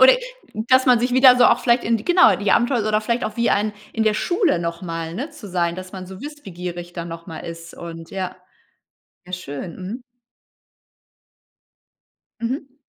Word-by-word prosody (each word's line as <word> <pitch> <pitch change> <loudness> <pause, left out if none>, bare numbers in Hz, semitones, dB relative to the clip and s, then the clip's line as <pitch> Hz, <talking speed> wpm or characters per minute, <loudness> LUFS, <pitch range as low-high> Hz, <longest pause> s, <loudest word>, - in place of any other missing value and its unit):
Oder 260 0 +9 0.6
dass 260 +1 +5
man 250 -2 +6
sich 245 +1 0
wieder 260 -1 +8
so 245 - +6
auch 245 - +5
vielleicht 240 0 +3
in 230 +1 +3
die 215 - -9
genau, 355 0 +6
die 205 0 -1
Abenteuer 240 -3 +2
oder 215 0 +2
vielleicht 235 +2 -1
auch 215 +1 -4
wie 235 - +2
ein 210 +1 +1 0.2
In 225 - 0
der 215 -1 +3
Schule 350 - +1
noch 170 +1 -4
mal, 165 -2 -4
ne, 270 - -4
zu 205 - -11
sein, 170 -1 0
dass 185 0 -8
man 185 -2 -7
so 190 +1 -10
wissbegierig 180 - -7
dann 170 -1 -5
noch 165 0 -8
mal 165 -3 -7
ist 165 0 -8
und 165 -1 -9
ja. 185 -1 -4 0.9
Ja 180 - -11
schön. 170 -1 -6
Mhm. 205 +7 -6 2.4
Mhm. 265 +3 -4
205 Hz, 185 wpm, -22 LUFS, 175-245 Hz, 2.4 s, Oder